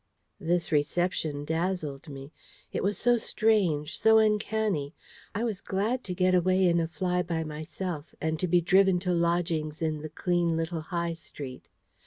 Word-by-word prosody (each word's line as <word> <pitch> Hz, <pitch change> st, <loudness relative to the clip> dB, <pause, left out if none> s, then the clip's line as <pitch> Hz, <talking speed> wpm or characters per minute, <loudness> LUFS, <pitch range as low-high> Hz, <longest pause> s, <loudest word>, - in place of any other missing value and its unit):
This 175 Hz, -1 st, 0 dB
reception 150 Hz, -1 st, 0 dB
dazzled 160 Hz, -3 st, -2 dB
me. 135 Hz, 0 st, -9 dB, 0.4 s
It -, -, -1 dB
was 200 Hz, +2 st, 0 dB
so 240 Hz, 0 st, +3 dB
strange, 185 Hz, -10 st, +1 dB
so 220 Hz, 0 st, +6 dB
uncanny. 210 Hz, -7 st, +1 dB, 0.4 s
I 220 Hz, -, -1 dB
was 215 Hz, -5 st, -2 dB
glad 220 Hz, +6 st, -1 dB
to 180 Hz, -, -4 dB
get 185 Hz, 0 st, +2 dB
away 185 Hz, +1 st, +3 dB
in 170 Hz, 0 st, +3 dB
a 165 Hz, -, 0 dB
fly 180 Hz, +1 st, -1 dB
by 165 Hz, -2 st, -2 dB
myself, 155 Hz, +1 st, -6 dB
and 160 Hz, 0 st, -1 dB
to 185 Hz, -, 0 dB
be 175 Hz, +1 st, +4 dB
driven 190 Hz, +1 st, +4 dB
to 180 Hz, -1 st, 0 dB
lodgings 170 Hz, -3 st, 0 dB
in 155 Hz, -2 st, -1 dB
the 155 Hz, -, -6 dB
clean 170 Hz, +1 st, 0 dB
little 165 Hz, 0 st, -2 dB
High 170 Hz, +1 st, -2 dB
Street. 140 Hz, -5 st, -9 dB
175 Hz, 165 wpm, -28 LUFS, 155-190 Hz, 0.4 s, so